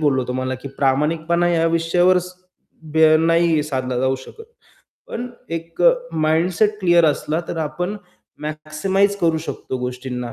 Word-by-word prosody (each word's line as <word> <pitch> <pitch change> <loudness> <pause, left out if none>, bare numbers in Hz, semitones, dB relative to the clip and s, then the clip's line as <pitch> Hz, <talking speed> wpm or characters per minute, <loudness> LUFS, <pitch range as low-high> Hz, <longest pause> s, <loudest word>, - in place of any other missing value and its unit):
बोललो 135 -4 +2
तुम्हाला, 130 +1 -2
की 130 +2 -8
प्रामाणिकपणा 160 +5 +1
या 165 -1 +2
विषयावर 175 +2 +3
स 180 +1 -7 0.6
बे 160 0 +6
नाही 165 -1 +3
साधला 130 -4 -2
जाऊ 130 0 +1
शकत, 430 - -12 0.6
पण 245 +2 -5 0.2
एक 165 0 -5
अ, - - +7 0.2
माइंडसेट 175 +7 +1
क्लिअर 175 -2 +4
असला, 155 +2 0
तर - - -4
आपण 180 +6 -3 0.4
मॅक्सिमाइज 155 +7 -1
करू 165 -2 +2
शकतो 130 - -5
गोष्टींना, 125 -1 -5
160 Hz, 140 wpm, -20 LUFS, 140-175 Hz, 0.6 s, अ